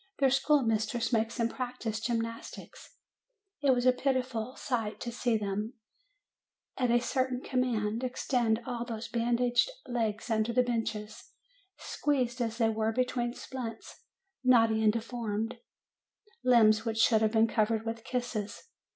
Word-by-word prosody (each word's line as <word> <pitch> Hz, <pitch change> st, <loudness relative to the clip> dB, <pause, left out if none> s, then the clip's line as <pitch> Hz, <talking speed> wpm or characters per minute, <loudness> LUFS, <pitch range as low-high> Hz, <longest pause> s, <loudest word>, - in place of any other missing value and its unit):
Their 270 Hz, -2 st, +3 dB
school 285 Hz, +1 st, +3 dB
mistress 225 Hz, +1 st, 0 dB
makes 225 Hz, +1 st, +1 dB
them 230 Hz, -2 st, +2 dB
practise 245 Hz, -3 st, -4 dB
gymnastics. 230 Hz, 0 st, -5 dB, 0.7 s
It 285 Hz, -, +2 dB
was 250 Hz, -1 st, +3 dB
a 255 Hz, -, +7 dB
pitiful 255 Hz, -2 st, -1 dB
sight 220 Hz, -5 st, -2 dB
to 240 Hz, -, -4 dB
see 235 Hz, -1 st, +1 dB
them, 210 Hz, +3 st, -3 dB, 1.0 s
at 250 Hz, -2 st, 0 dB
a 240 Hz, +1 st, +4 dB
certain 255 Hz, 0 st, -1 dB
command, 240 Hz, -3 st, -1 dB
extend 240 Hz, -2 st, 0 dB
all 245 Hz, -2 st, -3 dB
those 230 Hz, -1 st, -5 dB
bandaged 240 Hz, -, +2 dB, 0.2 s
legs 230 Hz, -2 st, -2 dB
under 220 Hz, +1 st, +1 dB
the 250 Hz, +1 st, +4 dB
benches, 220 Hz, -3 st, -3 dB, 0.5 s
squeezed 255 Hz, -4 st, -1 dB
as 230 Hz, -1 st, -2 dB
they 225 Hz, -2 st, +3 dB
were 220 Hz, 0 st, 0 dB
between 245 Hz, 0 st, -1 dB
splints, 230 Hz, -4 st, -7 dB, 0.4 s
knotty 225 Hz, -3 st, +4 dB
and 215 Hz, -, +6 dB
deformed; 230 Hz, 0 st, -3 dB, 0.8 s
limbs 225 Hz, -3 st, +5 dB
which 225 Hz, -1 st, -2 dB
should 225 Hz, -1 st, +4 dB
have 215 Hz, 0 st, +2 dB
been 225 Hz, 0 st, +5 dB
covered 220 Hz, 0 st, +1 dB
with 225 Hz, 0 st, -4 dB
kisses! 240 Hz, -5 st, -4 dB
235 Hz, 140 wpm, -30 LUFS, 220-250 Hz, 1.0 s, a